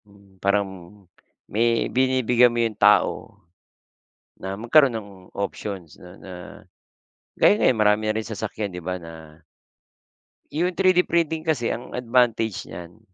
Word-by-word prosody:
Hmm, 100 -2 -23
parang 100 0 +1 0.8
may 115 +2 +1
binibigyan 125 -2 +3
mo 120 - -5
yung 115 - -2
tao - - +2 1.0
na 95 +1 -6
magkaroon 130 +4 +4
ng 110 -3 -6 0.2
options 100 -3 -6
na 90 - -14
na 95 - -11 1.0
gaya 205 - +4
ngayon, 125 - +2
marami 105 0 +3
na 110 - 0
rin 110 - -8
sasakyan 110 -1 -4
di - - -5
ba 90 +1 -4
na 80 -1 -13 1.1
Yung 175 +4 -1
3D 185 -1 +3
printing 160 -1 -1
kasi 130 -7 0
ang 120 - -6
advantage 115 -4 0
niyan 85 +4 -10
110 Hz, 130 wpm, -23 LUFS, 100-125 Hz, 1.1 s, magkaroon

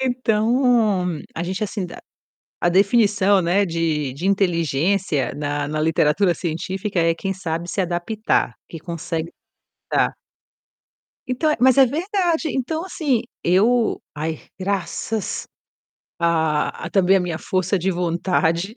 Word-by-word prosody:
Então, 225 - +2 0.2
a 165 - -3
gente 185 +4 -2
assim, 205 -1 -4
a - - -9 0.6
a - - +3
definição, 200 +1 +4
né, 180 +4 +2
de 160 -5 -1
de 150 +7 -6
inteligência 175 -4 +1
na 145 0 -2
na 155 +1 -3
literatura 160 +4 +2
científica 185 +4 -3
é 165 0 +2
quem 195 +3 -3
sabe 170 -2 -4
se - - -3
adaptar, 180 - 0 0.2
que 165 - -8
consegue 165 0 -4 0.6
tá. - - +2 1.2
Então 255 +5 0
é 300 - +1
mas 260 +1 +5
é 270 - +8
verdade. 335 - 0
Então 295 +6 -2
assim, 290 -10 0 0.2
eu 220 +6 +3
ai 155 +1 -3 0.2
graças 200 +2 -2 0.8
a 160 -3 0
a - - -4
também 195 +1 +4
a - - +1
minha 175 -3 -2
força 185 +3 0
de 185 +2 0
vontade. 175 +1 0
185 Hz, 130 wpm, -21 LUFS, 165-220 Hz, 1.2 s, é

